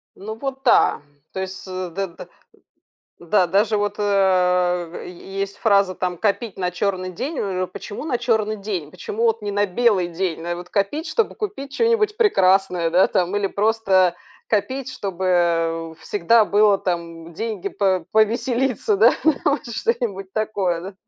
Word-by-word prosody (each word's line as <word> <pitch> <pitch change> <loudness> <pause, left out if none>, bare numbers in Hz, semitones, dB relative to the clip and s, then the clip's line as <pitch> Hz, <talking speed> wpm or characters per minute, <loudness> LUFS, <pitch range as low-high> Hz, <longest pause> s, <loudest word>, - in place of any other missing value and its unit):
Ну, 215 +3 -7
вот 270 +2 -5
да, 245 - +4 0.3
то - - -5
есть 190 0 -5
с 185 -1 -5
дэ 195 +3 -3
дэ 170 - -12 0.9
да, 180 +2 +2
даже 205 +5 +2
вот 205 0 -1
а 180 -3 +1
е 195 +2 -8
есть 200 0 -3
фраза 200 -4 +3
там: 180 -1 -2
"Копить 215 +3 -1
на 180 -1 -1
черный 185 0 -2
день". 275 - -4
У 185 -2 -1
почему 205 +7 -8
на 255 -6 0
черный 220 -3 0
день, 195 -7 -4
почему 205 +6 -4
вот 225 0 +2
не 205 - -3
на 205 0 +2
белый 195 -2 +2
день? 175 -1 -3
Надо 175 +1 -3
вот 180 0 -9
копить, 215 - -1
чтобы 455 - 0
купить 280 -10 -5
чё-нибудь 450 -1 +2
прекрасное, 190 - +3
да, 180 +3 +5
там 185 +1 0
или 205 - +1
просто 195 -3 +2 0.3
копить, 260 +5 -1
чтобы 170 -5 0
всегда 215 +4 +3
было 205 0 +4
там 170 -2 -4
деньги 210 -1 -3
по 190 -4 0
повеселиться, 245 - +1
да, 430 - +6 0.3
вот 290 -3 +1
что-нибудь 220 - -2
такое, 200 -6 -1
да? 190 +2 -8
195 Hz, 155 wpm, -21 LUFS, 180-225 Hz, 0.9 s, да